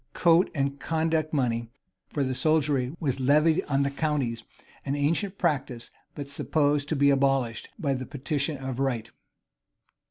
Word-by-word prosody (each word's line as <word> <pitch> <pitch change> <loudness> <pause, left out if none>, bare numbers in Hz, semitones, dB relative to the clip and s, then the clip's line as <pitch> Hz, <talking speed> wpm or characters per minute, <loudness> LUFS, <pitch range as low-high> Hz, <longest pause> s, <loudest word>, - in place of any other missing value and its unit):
Coat 170 +1 +4
and 140 0 -1
conduct 160 -1 0
money 120 -5 0 0.4
for 145 - -1
the 130 -1 -1
soldiery 145 -2 +1
was 135 -4 -1
levied 150 +5 +3
on 140 -1 +1
the 140 - -1
counties; 140 -6 -1 0.4
an 140 0 -2
ancient 170 +7 0
practice,[] 135 -8 -1 0.2
but 145 -1 -6
supposed 145 0 0
to 160 - 0
be 140 0 +4
abolished 135 -4 +1
by 145 -8 0
the 130 -1 -4
petition 145 +1 -2
of 130 -1 -5
right. 125 -5 -1
140 Hz, 150 wpm, -27 LUFS, 130-155 Hz, 0.4 s, Coat